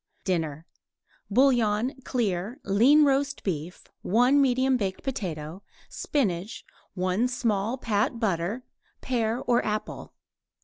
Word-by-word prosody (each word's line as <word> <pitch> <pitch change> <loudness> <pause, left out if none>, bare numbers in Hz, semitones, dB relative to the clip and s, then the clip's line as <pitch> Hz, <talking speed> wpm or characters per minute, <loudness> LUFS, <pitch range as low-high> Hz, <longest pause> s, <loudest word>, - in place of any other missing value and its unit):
DINNER 160 -5 -2 0.6
Bouillon, 240 0 +2
clear; 215 0 -2
lean 255 +10 +5
roast 280 0 0
beef; 175 -1 -4 0.2
1 250 +7 +3
medium 260 0 +2
baked 195 -6 -3
potato; 175 - -5 0.3
spinach; 200 - -2 0.3
1 185 +5 +1
small 230 -2 -1
pat 225 -1 -1
butter; 200 +2 -1 0.4
pear 235 -2 -1
or 240 -1 +2
apple. 215 0 -4
220 Hz, 100 wpm, -26 LUFS, 185-255 Hz, 0.6 s, lean